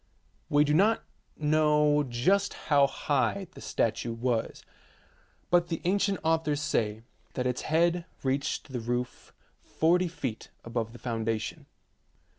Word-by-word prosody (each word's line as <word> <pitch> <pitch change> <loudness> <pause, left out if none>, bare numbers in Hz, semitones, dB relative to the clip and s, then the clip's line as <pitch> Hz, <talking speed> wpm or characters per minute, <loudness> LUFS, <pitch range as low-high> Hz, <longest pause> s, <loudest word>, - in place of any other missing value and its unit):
We 145 0 +5
do 150 0 +1
not 210 +7 +3 0.3
know 150 -1 +3
just 145 +11 +1
how 140 -2 +3
high 145 +7 0
the - - -12
statue 115 +1 -1
was, 115 0 -2 0.9
but 175 -1 +4
the 165 -2 -3
ancient 195 +2 +1
authors 160 -2 +1
say 110 -8 -1 0.3
that 125 - -1
its 125 -1 -1
head 170 +2 +1 0.2
reached 140 +1 -1
the 125 - -3
roof 120 +2 -4 0.3
forty 175 +3 +2
feet 130 -9 -5 0.2
above 115 -1 -3
the - - -10
foundation. 115 -2 -3
145 Hz, 125 wpm, -29 LUFS, 120-165 Hz, 0.9 s, We